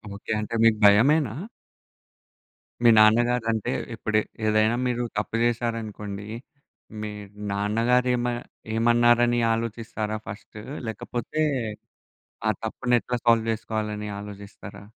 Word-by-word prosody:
Okay. 105 Hz, -, -7 dB
అంటే 105 Hz, +2 st, -4 dB
మీకు 115 Hz, -1 st, +5 dB
భయమేనా? 120 Hz, +5 st, +5 dB, 1.5 s
మీ 120 Hz, -, +7 dB
నాన్నగారంటే 115 Hz, +1 st, +3 dB, 0.2 s
ఇప్పుడు 110 Hz, -1 st, 0 dB, 0.3 s
ఏదైనా 110 Hz, +1 st, +3 dB
మీరు 120 Hz, 0 st, -1 dB
తప్పు 105 Hz, +2 st, -2 dB
జేశారనుకోండి. 110 Hz, -4 st, -2 dB, 0.7 s
మీ 105 Hz, 0 st, -4 dB, 0.4 s
నాన్నగారు 115 Hz, +5 st, +1 dB
ఏమ 120 Hz, 0 st, -1 dB, 0.5 s
ఏమన్నారని 120 Hz, +1 st, +4 dB
ఆలోచిస్తారా 110 Hz, -1 st, -3 dB
ఫస్టు? 105 Hz, 0 st, -9 dB, 0.3 s
లేకపోతే 120 Hz, +7 st, -4 dB, 1.1 s
ఆ -, -, +5 dB
తప్పునెట్లా 120 Hz, 0 st, 0 dB
సాల్వ్ 115 Hz, -1 st, +4 dB
జేసుకోవాలని 105 Hz, -1 st, -3 dB
ఆలోజిస్తారా? 100 Hz, -1 st, -10 dB
115 Hz, 90 wpm, -25 LUFS, 105-120 Hz, 1.5 s, మీ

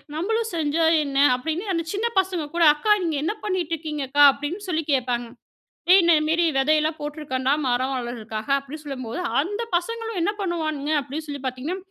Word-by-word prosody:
நம்மளும் 445 Hz, +6 st, -1 dB
செஞ்சா 315 Hz, +1 st, 0 dB, 0.2 s
என்ன? 275 Hz, -1 st, -4 dB, 0.2 s
அப்டின்னு 320 Hz, +9 st, -3 dB
அந்த 335 Hz, -, -1 dB
சின்ன 435 Hz, +4 st, 0 dB
பசங்க 365 Hz, -4 st, -1 dB
கூட, 340 Hz, -, +3 dB
அக்கா 365 Hz, +8 st, 0 dB
நீங்க 325 Hz, -3 st, -1 dB
என்ன 335 Hz, -, 0 dB
பண்ணிட்டு 360 Hz, -4 st, -1 dB
இருக்கீங்க 300 Hz, -2 st, -4 dB
அக்கா? 290 Hz, +1 st, +5 dB
அப்டின்னு 340 Hz, +10 st, -5 dB
சொல்லி 320 Hz, -2 st, 0 dB
கேட்பாங்க. 245 Hz, -2 st, 0 dB, 0.6 s
ஏய் 385 Hz, -, +9 dB
இந்தமேரி 325 Hz, 0 st, +3 dB
விதையெல்லாம் 305 Hz, +3 st, +2 dB
போட்ருக்கேன்டா 290 Hz, -3 st, -2 dB
மரம் 255 Hz, +2 st, 0 dB
வளர்றதுக்காக 225 Hz, -1 st, -6 dB
அப்டின்னு 280 Hz, +3 st, -8 dB
சொல்லும்போது, 255 Hz, +1 st, -5 dB, 0.2 s
அந்த 410 Hz, +8 st, -3 dB, 0.2 s
பசங்களும் 455 Hz, +2 st, -4 dB
என்ன 375 Hz, +5 st, +1 dB
பண்ணுவானுங்க 310 Hz, -5 st, -2 dB
அப்டின்னு 300 Hz, +4 st, -6 dB
சொல்லி 285 Hz, -2 st, -6 dB
பார்த்தீங்கன்னா, 260 Hz, +8 st, -3 dB
310 Hz, 160 wpm, -23 LUFS, 275-345 Hz, 0.6 s, ஏய்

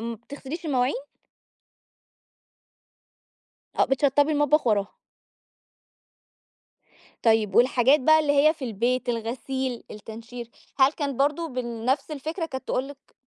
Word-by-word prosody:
ما 230 Hz, 0 st, -4 dB
بتغسليش 285 Hz, -, -8 dB
المواعين؟ 255 Hz, -2 st, +1 dB, 2.9 s
آه -, -, +6 dB
بتشطبي 285 Hz, +2 st, +2 dB
المطبخ 295 Hz, -2 st, +2 dB
وراها. 205 Hz, -2 st, +1 dB, 2.3 s
طيّب 220 Hz, -3 st, +2 dB
والحاجات 255 Hz, +3 st, +4 dB
بقى 315 Hz, +4 st, +5 dB
اللي 295 Hz, -2 st, +1 dB
هي 300 Hz, +2 st, +5 dB
في 280 Hz, -5 st, -7 dB
البيت، 245 Hz, +3 st, -1 dB
الغسيل 245 Hz, +2 st, -3 dB
التنشير، 230 Hz, +3 st, -9 dB, 0.3 s
هل 265 Hz, +2 st, +6 dB
كان 280 Hz, -5 st, -4 dB
برضه 300 Hz, +4 st, +1 dB
بنفس 255 Hz, +3 st, -2 dB
الفكرة 315 Hz, +4 st, -4 dB
كانت 260 Hz, -4 st, -7 dB
تقول 260 Hz, +2 st, -1 dB
لِك 280 Hz, -1 st, -15 dB
260 Hz, 110 wpm, -25 LUFS, 235-290 Hz, 2.9 s, آه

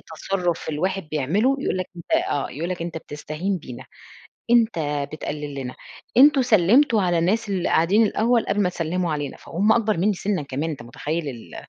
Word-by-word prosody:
تصرف 175 Hz, -1 st, -2 dB
الواحد 185 Hz, +5 st, -1 dB
بيعمله 185 Hz, -, +1 dB
يقول 270 Hz, -, -1 dB
لك 185 Hz, -, -2 dB
أنت 170 Hz, -, -11 dB, 0.2 s
آه، 140 Hz, -, -1 dB
يقول 165 Hz, +5 st, -4 dB
لك 180 Hz, -2 st, -4 dB
أنت 170 Hz, -1 st, -4 dB
بتستهين 155 Hz, +5 st, -4 dB
بينا، 130 Hz, -5 st, -10 dB, 0.7 s
أنت 235 Hz, -5 st, +4 dB, 0.3 s
بتقلل 150 Hz, -1 st, -5 dB
لنا 130 Hz, -2 st, -5 dB, 0.4 s
أنتم 280 Hz, +1 st, +7 dB
سلمتوا 225 Hz, -, +4 dB
على 175 Hz, -2 st, +1 dB
الناس 205 Hz, +7 st, +1 dB
اللي 190 Hz, -3 st, -1 dB
قاعدين 185 Hz, +8 st, +3 dB
الأوّل 230 Hz, +3 st, +1 dB
قبل 205 Hz, -, 0 dB
ما 180 Hz, -, +2 dB
تسلموا 175 Hz, 0 st, -2 dB
علينا، 145 Hz, -2 st, -4 dB
فهم 205 Hz, +6 st, +1 dB
أكبر 220 Hz, -2 st, +1 dB
مِنّي 200 Hz, +5 st, +2 dB
سنًا 195 Hz, -2 st, -2 dB
كمان 145 Hz, +3 st, -3 dB
أنت 140 Hz, -5 st, -6 dB
متخيّل؟ 150 Hz, +6 st, -4 dB
ال 120 Hz, -4 st, -9 dB
175 Hz, 175 wpm, -23 LUFS, 150-210 Hz, 0.7 s, أنتم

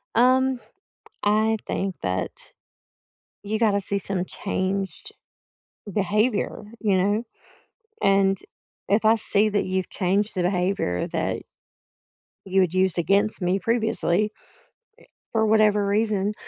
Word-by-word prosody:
Um, 255 Hz, +2 st, +3 dB, 0.6 s
I 215 Hz, +2 st, +2 dB
think 190 Hz, -1 st, -2 dB
that 90 Hz, -1 st, -4 dB, 0.9 s
you 215 Hz, +1 st, -2 dB
gotta 210 Hz, -3 st, +3 dB
see 200 Hz, 0 st, -2 dB
some 190 Hz, -2 st, -2 dB
changed 195 Hz, -, -3 dB, 0.8 s
behavior, 210 Hz, +3 st, 0 dB, 0.2 s
you 205 Hz, -4 st, +2 dB
know? 205 Hz, +4 st, +1 dB, 0.8 s
And 195 Hz, 0 st, +3 dB, 0.5 s
if 210 Hz, +2 st, +2 dB
I 220 Hz, +1 st, +6 dB
see 215 Hz, -1 st, +2 dB
that 205 Hz, -1 st, 0 dB
you've 185 Hz, -1 st, -2 dB
changed 200 Hz, +3 st, 0 dB
the 180 Hz, -, 0 dB
behavior 180 Hz, -, 0 dB
that -, -, -2 dB, 1.0 s
you 190 Hz, 0 st, +2 dB
had 185 Hz, -2 st, +1 dB
used 185 Hz, -1 st, +2 dB
against 200 Hz, +5 st, +2 dB
me 180 Hz, +2 st, +1 dB
previously 220 Hz, -3 st, +1 dB
eh, -, -, -30 dB, 0.9 s
for 220 Hz, -1 st, +2 dB
whatever 210 Hz, -1 st, +3 dB
reason, 205 Hz, 0 st, +1 dB
200 Hz, 115 wpm, -24 LUFS, 190-215 Hz, 1.0 s, I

